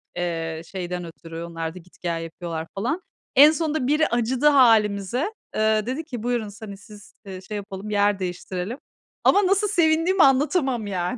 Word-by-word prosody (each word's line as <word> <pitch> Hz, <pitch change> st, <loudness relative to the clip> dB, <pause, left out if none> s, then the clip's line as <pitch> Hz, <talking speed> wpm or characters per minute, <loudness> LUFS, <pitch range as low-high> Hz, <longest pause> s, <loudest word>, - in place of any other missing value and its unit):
eee, 165 Hz, -2 st, -3 dB
şeyden 180 Hz, -1 st, -5 dB
ötürü. 165 Hz, 0 st, -9 dB
Onlar 165 Hz, -1 st, -5 dB
da, -, -, -8 dB
git 180 Hz, +1 st, -22 dB
gel 170 Hz, -2 st, -2 dB
yapıyorlar 165 Hz, -1 st, -6 dB
falan. 250 Hz, -, -2 dB, 0.3 s
En 290 Hz, +3 st, +9 dB
sonunda 315 Hz, -4 st, -1 dB
biri 305 Hz, +2 st, +3 dB
acıdı 240 Hz, +4 st, +1 dB
hâlimize. 230 Hz, -, +3 dB, 0.2 s
Eee, 215 Hz, -1 st, +2 dB
dedi 260 Hz, +7 st, -3 dB
ki, 245 Hz, -8 st, -7 dB
buyurun 240 Hz, -3 st, -1 dB
s 215 Hz, +2 st, -10 dB
hani 200 Hz, -2 st, -8 dB
siz, 210 Hz, 0 st, -15 dB
eee, 190 Hz, -2 st, -8 dB
şey 210 Hz, +3 st, -7 dB
yapalım, 200 Hz, 0 st, -7 dB
yer 205 Hz, -1 st, +2 dB
değiştirelim 180 Hz, +4 st, -4 dB, 0.5 s
ama 400 Hz, -1 st, +4 dB
nasıl 400 Hz, +2 st, +2 dB
sevindiğimi 340 Hz, 0 st, +3 dB
anlatamam 270 Hz, -, +2 dB
yani. 185 Hz, +4 st, -2 dB
215 Hz, 165 wpm, -23 LUFS, 180-275 Hz, 0.5 s, En